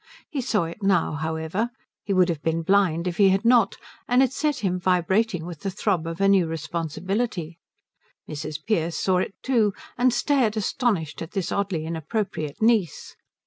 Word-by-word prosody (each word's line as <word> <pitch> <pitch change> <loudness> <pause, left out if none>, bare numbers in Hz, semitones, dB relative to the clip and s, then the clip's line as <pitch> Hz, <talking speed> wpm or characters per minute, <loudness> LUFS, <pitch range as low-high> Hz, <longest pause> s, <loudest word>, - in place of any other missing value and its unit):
He 280 - -2
saw 225 -6 +1
it 165 +6 -7
now, 195 -4 +2
however; 160 +8 -2 0.3
he 205 - -5
would 185 -2 +4
have 160 -4 -2
been 165 +1 -1
blind 185 -2 +2
if 175 - -3
he 200 -2 +6
had 195 +4 +1
not; 230 -4 +4 0.3
and 250 +2 +4
it 265 -1 0
set 300 -4 -1
him 180 -1 0
vibrating 180 +1 +1
with 170 -3 -7
the 195 - -3
throb 185 -3 -1
of 165 0 -5
a 195 - +3
new 195 -4 +4
responsibility. 170 +3 -3 0.7
Mrs. 155 0 -5
Pearce 170 -7 0
saw 185 -1 +2
it 190 - -3
too, 225 -6 +2 0.2
and 250 +1 +4
stared 240 -3 +1
astonished 195 - -1
at 165 - -7
this 195 -4 -2
oddly 190 -6 -1
inappropriate 160 0 -3
niece. 220 -8 +1
185 Hz, 175 wpm, -24 LUFS, 165-215 Hz, 0.7 s, he